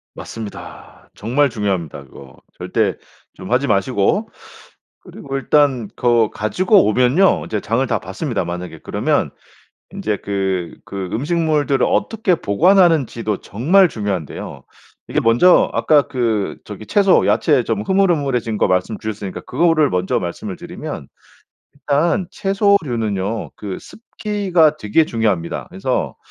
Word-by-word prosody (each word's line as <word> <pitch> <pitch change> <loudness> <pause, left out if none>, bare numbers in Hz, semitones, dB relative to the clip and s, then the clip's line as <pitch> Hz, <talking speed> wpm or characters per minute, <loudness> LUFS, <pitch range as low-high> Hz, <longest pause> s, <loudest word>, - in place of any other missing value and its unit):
맞습니다. 110 -3 -10
정말 130 +6 +1
중요합니다 95 -10 -3
그거. 65 0 -15 0.2
절대 - - 0 0.4
좀 95 +4 -9
하지 130 +3 +2
마시고. 105 - +1 0.7
그리고 135 -1 -8
일단 135 -6 +2
거 120 -3 +2
가지고 185 - +2
오면요 130 - +3
이제 105 - -2
장을 120 +4 0
다 - - 0
봤습니다 95 - -3
만약에. 85 -2 -6
그러면 - - 0 0.6
인제 105 -1 -2
그 95 -3 -3
그 95 -2 -5
음식물들을 150 0 +1
어떻게 205 -3 +1
보관하는지도 155 - +2
정말 170 - +3
중요한데요. 100 -8 -5 0.4
이게 - - 0
먼저 120 +11 +5
아까 150 -2 +3
그 115 -7 -1
저기 105 +1 -9
채소, 200 -3 +4
야채 140 -7 +3
좀 110 -3 -2
흐물흐물해진 140 - +1
거 - - +3
말씀주셨으니까 100 +2 -3
그거를 155 +1 +2
먼저 90 +1 0
말씀을 135 - -5
드리면 170 - -7 0.7
일단 150 +6 0
채소류는요 120 - 0
그 100 -3 -6
습기가 195 -9 0
되게 105 +9 +2
중요합니다. 105 -8 -1
그래서 - - -2
120 Hz, 305 characters per minute, -19 LUFS, 100-165 Hz, 0.7 s, 먼저